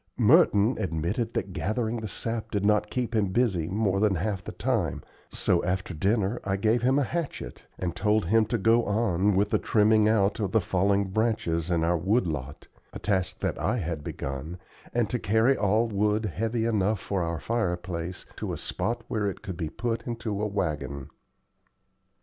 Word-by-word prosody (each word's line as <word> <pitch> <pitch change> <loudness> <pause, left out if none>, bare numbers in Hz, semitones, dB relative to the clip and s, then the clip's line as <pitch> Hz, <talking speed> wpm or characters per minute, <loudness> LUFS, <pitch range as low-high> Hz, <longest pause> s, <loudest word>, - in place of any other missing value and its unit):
Merton 120 - +5
admitted 95 +8 -2
that 95 - -2
gathering 110 +5 -1
the 110 -1 -4
sap 115 +2 -3
did 100 -2 -1
not 105 0 +3
keep 125 0 -2
him 105 -2 +2
busy 95 -5 +1
more 100 -1 +1
than 105 -2 +3
half 95 +2 -2
the - - -6
time; - - -1 0.3
so 85 - +1
after 90 +1 -2
dinner 100 +6 0
I 95 0 0
gave 110 +4 +2
him 130 +3 +3
a 145 - +3
hatchet, 145 - -4 0.2
and 90 -2 -3
told 105 +1 +2
him 110 +5 +3
to 115 - 0
go 115 +3 +4
on 100 -2 +1
with 100 +2 +2
the - - +3
trimming 110 0 +4
out 105 0 +2
of 100 -2 -2
the 110 - +5
fallen 100 +1 +1
branches 95 -5 0
in 85 -2 +1
our 85 +1 +2
wood 100 +6 +2
lot 70 -4 -5 0.2
a - - -7
task 95 -3 -1
that - - -1
I 125 - 0
had 85 -7 -3
begun 70 +6 -5 0.3
and 120 -2 +1
to 125 - 0
carry 110 +7 +3
all 110 +2 +2
wood 105 +1 +1
heavy 110 +5 -1
enough 105 -2 +1
for 95 -1 -2
our 85 -1 -2
fireplace 90 -5 -2
to - - -3
a - - -4
spot 115 +1 -3
where 105 -4 0
it 95 - -8
could 95 - -5
be 80 -2 -3
put 115 +5 -3
into 115 -4 -3
a 105 - +1
wagon. 75 -9 -3
105 Hz, 185 wpm, -27 LUFS, 90-115 Hz, 0.3 s, Merton